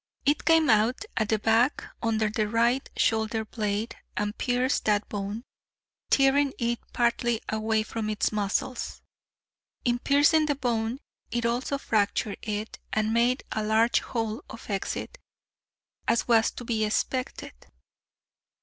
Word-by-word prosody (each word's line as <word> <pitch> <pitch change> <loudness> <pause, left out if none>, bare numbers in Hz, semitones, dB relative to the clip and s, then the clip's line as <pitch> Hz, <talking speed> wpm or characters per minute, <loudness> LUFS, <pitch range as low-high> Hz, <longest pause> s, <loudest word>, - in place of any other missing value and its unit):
It 290 +1 +2
came 325 -2 +5
out 225 - +3
at 215 -2 0
the 220 - +3
back 225 +5 +2 0.2
under 220 -1 +1
the 215 0 0
right 235 +4 +1
shoulder 220 -1 +1
blade 210 0 -2 0.2
and 210 0 -1
pierced 250 +2 0
that 210 -1 +2
bone, 205 +2 -4 0.7
tearing 275 0 +4
it 235 0 -1
partly 235 -1 +1
away 220 0 +1
from 215 0 -4
its 215 - 0
muscles. 210 +4 -2 0.8
In 240 0 +2
piercing 295 +4 +4
the 290 - +1
bone 240 -1 -1 0.3
it 235 -1 -1
also 245 +4 0
fractured 210 -4 0
it, 215 0 -4
and 215 0 +1
made 240 +3 +2
a 215 - -1
large 220 +2 +3
hole 225 +1 -3
of 230 - -9
exit, 200 - -3 0.9
as 235 - +2
was 225 -2 +4
to - - -9
be 225 -2 0
expected." 250 +4 -2
230 Hz, 135 wpm, -27 LUFS, 215-250 Hz, 0.9 s, came